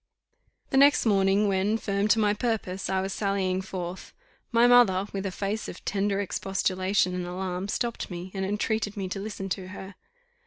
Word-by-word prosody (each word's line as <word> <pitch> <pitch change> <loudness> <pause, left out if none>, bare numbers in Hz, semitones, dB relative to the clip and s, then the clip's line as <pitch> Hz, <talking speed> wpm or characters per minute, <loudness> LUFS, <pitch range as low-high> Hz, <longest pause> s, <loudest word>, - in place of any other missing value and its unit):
The 270 - +2
next 280 0 +6
morning, 200 -1 +3
when, 200 +3 +1
firm 200 -1 -1
to 220 - +4
my 210 -2 +3
purpose, 210 -4 -2
I 190 0 +1
was 190 0 -3
sallying 190 -2 0
forth, 185 -1 -6 0.4
my 235 0 +5
mother, 240 -6 +5
with 195 0 -2
a - - -3
face 200 +4 -3
of - - -10
tender 200 0 0
expostulation 190 -1 0
and 180 -1 -3
alarm, 185 +1 -3
stopped 235 +3 -2
me, 180 0 -7
and 190 -1 -3
entreated 205 +1 -1
me 195 -2 -2
to 195 - -4
listen 200 -1 -5
to 185 0 -3
her. 190 +1 -9
195 Hz, 180 wpm, -27 LUFS, 190-210 Hz, 0.4 s, next